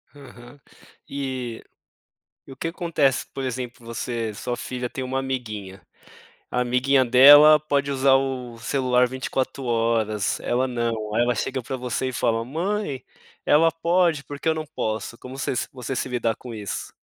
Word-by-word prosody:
Aham. 130 Hz, -1 st, -14 dB, 0.5 s
E, 130 Hz, -4 st, -4 dB, 0.8 s
e -, -, -11 dB
o -, -, -9 dB
que 150 Hz, -, -4 dB
acontece, 165 Hz, -6 st, 0 dB
por 135 Hz, -, -4 dB
exemplo, 125 Hz, -1 st, -5 dB
você 115 Hz, -1 st, -3 dB
sua 120 Hz, +4 st, -4 dB
filha 125 Hz, 0 st, -5 dB
tem 130 Hz, -, -5 dB
uma 130 Hz, +1 st, -2 dB
amiguinha, 110 Hz, -8 st, -5 dB, 0.7 s
a 125 Hz, -, 0 dB
amiguinha 130 Hz, +2 st, +3 dB
dela 145 Hz, +5 st, +9 dB
pode 140 Hz, -2 st, 0 dB
usar 135 Hz, 0 st, +3 dB
o 130 Hz, -3 st, -2 dB
celular 125 Hz, 0 st, +2 dB
24 130 Hz, +1 st, -3 dB
horas, 115 Hz, -3 st, 0 dB
ela 125 Hz, +2 st, 0 dB
não, 115 Hz, -3 st, -2 dB
aí 120 Hz, -, +4 dB
ela 120 Hz, 0 st, +1 dB
chega 130 Hz, +4 st, -2 dB
para 130 Hz, -, -4 dB
você 125 Hz, +1 st, -2 dB
e -, -, -7 dB
fala: 115 Hz, -2 st, 0 dB
"Mãe, 165 Hz, -, -2 dB, 0.4 s
ela 165 Hz, +2 st, +5 dB
pode, 170 Hz, -2 st, +1 dB
por 145 Hz, 0 st, -8 dB
que -, -, -4 dB
eu -, -, +3 dB
não 155 Hz, 0 st, -4 dB
posso?". 115 Hz, -6 st, -4 dB
Como 130 Hz, +2 st, -10 dB
você 135 Hz, -, -2 dB
se -, -, -1 dB
você 130 Hz, 0 st, -5 dB
se -, -, -2 dB
lidar 115 Hz, -2 st, 0 dB
com 125 Hz, +1 st, -9 dB
isso? 105 Hz, -3 st, -5 dB
130 Hz, 170 wpm, -24 LUFS, 120-140 Hz, 0.8 s, dela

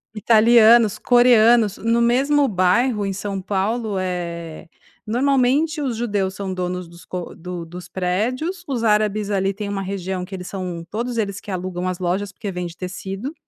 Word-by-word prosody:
italianos, 225 Hz, 0 st, +5 dB
coreanos, 235 Hz, -3 st, +5 dB
no 230 Hz, +1 st, +1 dB
mesmo 270 Hz, +4 st, +3 dB
bairro 210 Hz, +4 st, +2 dB
em 195 Hz, -, -1 dB
São 195 Hz, 0 st, -4 dB
Paulo, 205 Hz, +2 st, -1 dB
eh, 170 Hz, -3 st, -5 dB, 0.4 s
normalmente 275 Hz, +6 st, +2 dB
os 250 Hz, -5 st, -2 dB
judeus 200 Hz, -5 st, -1 dB
são 195 Hz, -2 st, -4 dB
donos 180 Hz, -1 st, -3 dB
dos 170 Hz, 0 st, -15 dB
co 180 Hz, -2 st, -6 dB
do 175 Hz, 0 st, -7 dB
dos 175 Hz, +2 st, -10 dB
prédios. 245 Hz, -, -2 dB
Os 250 Hz, -4 st, -2 dB
árabes 210 Hz, -1 st, +1 dB
ali 195 Hz, 0 st, 0 dB
têm 205 Hz, -1 st, -5 dB
uma 200 Hz, -1 st, -3 dB
região 190 Hz, -1 st, -4 dB
que 190 Hz, +1 st, -7 dB
eles 180 Hz, -1 st, -7 dB
são 180 Hz, -3 st, -5 dB
todos 235 Hz, +2 st, -3 dB
eles 205 Hz, -2 st, -2 dB
que -, -, -13 dB
alugam 185 Hz, -1 st, -3 dB
as 185 Hz, -1 st, -2 dB
lojas, 190 Hz, +2 st, -2 dB
porque 200 Hz, +1 st, -6 dB
vende 175 Hz, -2 st, -5 dB
tecido. 195 Hz, -, -5 dB
200 Hz, 165 wpm, -21 LUFS, 185-235 Hz, 0.4 s, italianos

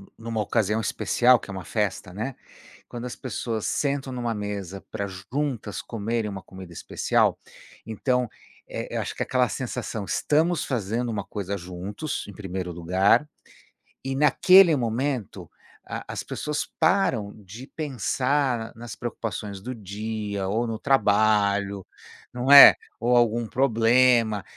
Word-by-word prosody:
numa 115 Hz, -1 st, -4 dB
ocasião 105 Hz, 0 st, 0 dB
especial 120 Hz, +2 st, +3 dB
que -, -, -13 dB
é -, -, -4 dB
uma 95 Hz, -4 st, -7 dB
festa, 100 Hz, -4 st, -2 dB
né, 115 Hz, +7 st, -4 dB, 0.5 s
quando 120 Hz, 0 st, -7 dB
as 125 Hz, -, -6 dB
pessoas 115 Hz, -3 st, -4 dB
sentam 140 Hz, -2 st, -1 dB
numa 120 Hz, -2 st, -2 dB
mesa 100 Hz, -2 st, -5 dB
pra 100 Hz, -, -3 dB
juntas 110 Hz, +4 st, -4 dB
comerem 115 Hz, 0 st, -3 dB
uma 95 Hz, -2 st, -7 dB
comida 95 Hz, -2 st, -11 dB
especial, 85 Hz, -, 0 dB, 0.4 s
então, 125 Hz, +2 st, -1 dB, 0.4 s
eh, -, -, -5 dB
eu -, -, 0 dB
acho -, -, -5 dB
que -, -, -1 dB
aquela 125 Hz, -3 st, +1 dB
sensação 110 Hz, -2 st, -4 dB
"estamos 160 Hz, -, +1 dB
fazendo 120 Hz, 0 st, -2 dB
uma 105 Hz, -3 st, -3 dB
coisa 100 Hz, -1 st, -4 dB
juntos", 95 Hz, -, -5 dB
em -, -, -8 dB
primeiro 95 Hz, -2 st, -5 dB
lugar 95 Hz, -, +2 dB, 0.8 s
e, 135 Hz, 0 st, -2 dB
naquele 170 Hz, +4 st, +6 dB
momento, 120 Hz, -2 st, -2 dB, 0.4 s
a -, -, -6 dB
as -, -, -4 dB
pessoas 150 Hz, 0 st, -3 dB
param 135 Hz, -, +2 dB
de 110 Hz, +8 st, -10 dB
pensar 135 Hz, -3 st, -1 dB
nas 115 Hz, -1 st, -8 dB
preocupações 105 Hz, -4 st, -5 dB
do 125 Hz, +6 st, -6 dB
dia 105 Hz, -1 st, -4 dB
ou 115 Hz, +4 st, 0 dB
no 115 Hz, -1 st, -4 dB
trabalho, 100 Hz, -5 st, +2 dB, 0.5 s
não 125 Hz, +2 st, -2 dB
é? 140 Hz, 0 st, +12 dB, 0.2 s
Ou 120 Hz, +1 st, +1 dB
algum 120 Hz, -1 st, +2 dB
problema, 115 Hz, -3 st, +3 dB
115 Hz, 135 wpm, -25 LUFS, 100-125 Hz, 0.8 s, é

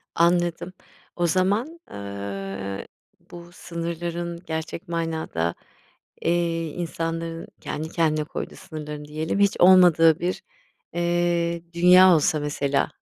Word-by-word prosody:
Anladım. 175 Hz, +1 st, +1 dB, 0.4 s
O 175 Hz, -1 st, +1 dB
zaman, 205 Hz, -, 0 dB
eee, 100 Hz, -1 st, -6 dB, 0.4 s
bu 175 Hz, 0 st, -11 dB
sınırların 170 Hz, 0 st, -5 dB
gerçek 160 Hz, +3 st, -5 dB
manada, 160 Hz, -, -2 dB, 0.7 s
eee, 170 Hz, -1 st, 0 dB
insanların 165 Hz, 0 st, -4 dB
kendi 155 Hz, +1 st, -4 dB
kendine 155 Hz, -2 st, +1 dB
koyduğu -, -, -6 dB
sınırlarını 150 Hz, -1 st, -8 dB
diyelim, 155 Hz, +5 st, -3 dB
hiç 200 Hz, -1 st, +3 dB
olmadığı 175 Hz, -3 st, +7 dB
bir, 180 Hz, +1 st, -2 dB, 0.5 s
eee, 170 Hz, -1 st, 0 dB
dünya 180 Hz, +1 st, +7 dB
olsa 155 Hz, 0 st, +2 dB
mesela. 145 Hz, -1 st, 0 dB
165 Hz, 100 wpm, -24 LUFS, 155-175 Hz, 0.7 s, olmadığı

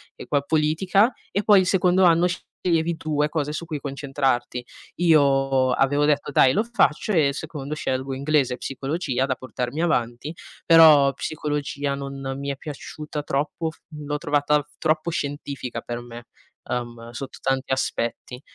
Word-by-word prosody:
e -, -, -10 dB
poi 145 Hz, -1 st, +1 dB
politica, 180 Hz, -, +2 dB, 0.2 s
e 200 Hz, -, 0 dB
poi 205 Hz, -3 st, +6 dB
il 185 Hz, -, -1 dB
secondo 185 Hz, 0 st, +3 dB
anno 170 Hz, 0 st, +5 dB
sceglievi 170 Hz, -2 st, -2 dB
tu 150 Hz, -2 st, -1 dB
le 150 Hz, -, +2 dB
cose 150 Hz, -1 st, -2 dB
su 170 Hz, +2 st, -5 dB
cui 155 Hz, -3 st, -4 dB
concentrarti. 135 Hz, -3 st, -2 dB, 0.3 s
Io 135 Hz, -5 st, +3 dB
avevo 145 Hz, +3 st, +2 dB
detto: 145 Hz, -1 st, +1 dB
"Dai 130 Hz, -1 st, +5 dB
lo 215 Hz, -, +2 dB
faccio 235 Hz, -2 st, +1 dB
e 160 Hz, -6 st, +4 dB
al 140 Hz, -, -1 dB
secondo 150 Hz, -1 st, -5 dB
scelgo 130 Hz, -1 st, -2 dB
inglese 140 Hz, -2 st, +1 dB
e -, -, -16 dB
psicologia 135 Hz, -1 st, -2 dB
da 130 Hz, -, 0 dB
portarmi 130 Hz, +3 st, -4 dB
avanti". 125 Hz, -1 st, -1 dB, 0.3 s
Però, 155 Hz, -4 st, +7 dB
psicologia 145 Hz, -1 st, -3 dB
non 140 Hz, 0 st, -6 dB, 0.2 s
mi 140 Hz, 0 st, -4 dB
è 140 Hz, -, -2 dB
piaciuta 150 Hz, 0 st, -7 dB
troppo, 150 Hz, +3 st, -2 dB
f 160 Hz, -, -14 dB
l'ho 150 Hz, -1 st, -4 dB
trovata 145 Hz, -1 st, +1 dB
troppo 160 Hz, +1 st, 0 dB
scientifica 140 Hz, -5 st, -4 dB
per 120 Hz, 0 st, -5 dB
me, 120 Hz, -1 st, -10 dB, 0.4 s
uhm, 120 Hz, -1 st, -4 dB
sotto 135 Hz, +2 st, -7 dB
tanti 135 Hz, 0 st, -1 dB
aspetti 125 Hz, 0 st, -3 dB
145 Hz, 160 wpm, -23 LUFS, 135-160 Hz, 0.4 s, Però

